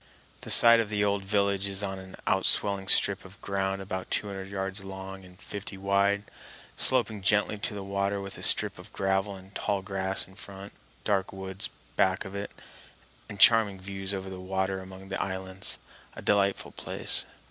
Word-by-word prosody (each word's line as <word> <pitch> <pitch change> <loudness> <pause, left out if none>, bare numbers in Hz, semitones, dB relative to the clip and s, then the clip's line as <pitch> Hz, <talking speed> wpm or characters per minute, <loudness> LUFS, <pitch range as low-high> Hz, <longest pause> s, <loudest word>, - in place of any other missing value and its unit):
The - - -9
site 115 0 +10
of 110 -2 -2
the 105 -1 -1
old 100 -1 -1
village 100 0 0
is 100 0 -2
on 95 -1 -4
an 95 0 -12
outswelling 95 0 +1
strip 100 -1 +4
of 95 +1 -15
ground 95 0 -3
about 95 -1 -6
two - - -1
hundred 95 -1 -7
yards 95 0 -5
long 95 0 -9
and 90 0 -17
fifty 100 -1 -7
wide, 100 +1 0 0.5
sloping 110 -5 +5
gently 105 +1 +1
to 105 - -1
the 100 - -6
water 100 +1 -2
with 100 0 -7
a - - -10
strip - - +3
of - - -13
gravel 95 +1 -1
and 95 +1 -15
tall 100 -2 -2
grass 95 0 +2
in 95 - -18
front, 100 0 -11 0.3
dark 100 -2 -1
woods 95 0 -6 0.3
back 95 -1 +1
of 95 - -9
it, 100 +1 -5 0.8
and 100 - -9
charming 110 -4 +5
views 95 0 -5
over 95 -1 -6
the 95 - -8
water 95 +1 -3
among 95 0 -12
the 95 - -3
islands—a 95 0 -5
delightful 100 -1 0
place. - - +2
95 Hz, 180 wpm, -27 LUFS, 95-100 Hz, 0.8 s, site